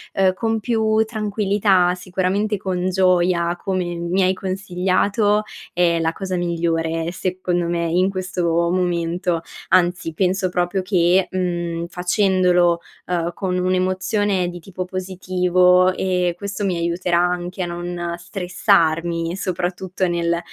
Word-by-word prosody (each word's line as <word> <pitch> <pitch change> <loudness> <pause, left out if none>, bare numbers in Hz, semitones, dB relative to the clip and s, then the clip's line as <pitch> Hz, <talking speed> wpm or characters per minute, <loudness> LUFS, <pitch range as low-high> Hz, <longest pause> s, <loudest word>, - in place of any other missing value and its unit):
uhm, 190 -1 +3
con 225 +2 -1
più 220 -1 +1
tranquillità, 205 -4 +1
sicuramente 190 +3 -1
con 185 -1 -2
gioia 180 -2 +2
come, 185 -2 -1
mi 170 +3 0
hai 185 +1 +3
consigliato 195 +3 0 0.3
è 170 -1 +2
la 165 0 0
cosa 185 0 -4
migliore 165 -1 -1
secondo 180 -1 -2
me, 170 0 -1
in 185 +3 +3
questo 185 -2 -3 0.3
momento, 175 -1 0 0.3
anzi, 175 -2 +2
penso 185 0 +1
proprio 180 +2 0
che, 185 -1 +2
mhmm, 175 -2 -2
facendolo, 180 -1 +2 0.3
uhm, 175 -1 -1
con 185 -2 -2
un'emozione 185 +1 0
di 175 - -7
tipo 185 +1 -6
positivo, 185 0 +2
ehm, 180 -2 0
questo 200 +2 -4
mi 185 -3 0
aiuterà 170 +1 0
anche 180 +1 -1
a 175 - -1
non 175 0 -4
stressarmi, 175 -2 0
soprattutto 185 0 -2
nel, 170 0 0
180 Hz, 125 wpm, -21 LUFS, 175-190 Hz, 0.3 s, uhm